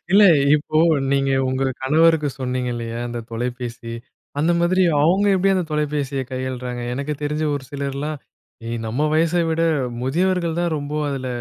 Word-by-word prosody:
இல்ல. 205 - +7 0.3
இப்போ 150 +1 -1 0.4
நீங்க 135 0 +1 0.2
உங்க 130 +1 0 0.2
கணவருக்கு 155 +2 +3
சொன்னீங்க 125 -1 -2
இல்லையா, 115 0 -5
அந்த 120 0 -4
தொலைபேசி, 120 0 -5 0.5
அந்த 160 +4 +2
மாதிரி 185 +2 +3 0.2
அவுங்க 185 +6 +3
எப்படி 190 +1 +2
அந்த 185 -2 0
தொலைபேசிய 145 -3 -1
கையாளுறாங்க? 125 -1 -4
எனக்கு 140 +3 -3
தெரிஞ்ச 150 +1 -1
ஒரு 140 -2 -5
சிலர்லாம் 140 +2 -3 0.7
நம்ம 120 +7 -1
வயச 160 +1 +2 0.2
விட 160 0 0 0.4
முதியவர்கள் 170 +4 0
தான் 170 -2 0
ரொம்ப 145 +1 -5
அதில 135 -2 -3
145 Hz, 140 wpm, -21 LUFS, 130-160 Hz, 0.7 s, இல்ல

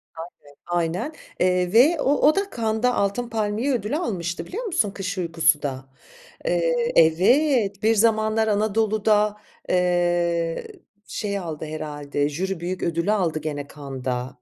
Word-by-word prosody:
Aynen, 165 +2 -8 0.3
aynen. 175 - -1 0.3
Eee, 180 0 +1
ve 290 +8 +5
o 280 - +3
o 305 - +5
da 395 +1 +1
Cannes'da 225 +2 +1
Altın 200 +5 -1
Palmiye 220 +4 -1
ödülü 230 +3 -2
almıştı 175 - -3
biliyor 455 +7 -5
musun 230 - 0
Kış 195 -1 -5
Uykusu 165 -3 +2
da. 130 -2 -4 0.6
Eee, - - +1
evet, 205 - +3
Bir 225 +1 +4
Zamanlar 220 0 +2
Anadolu'da, 210 0 +2 0.3
eee, 175 - 0 0.4
şey 200 -2 -3
aldı 160 -4 -6
herhâlde, 145 -2 -3
jüri 180 +4 -3
büyük 180 +1 -4
ödülü 170 +4 0
aldı 170 -7 0
gene 145 -2 -4
Cannes'da. 130 -3 -4
195 Hz, 135 wpm, -23 LUFS, 165-225 Hz, 0.6 s, ve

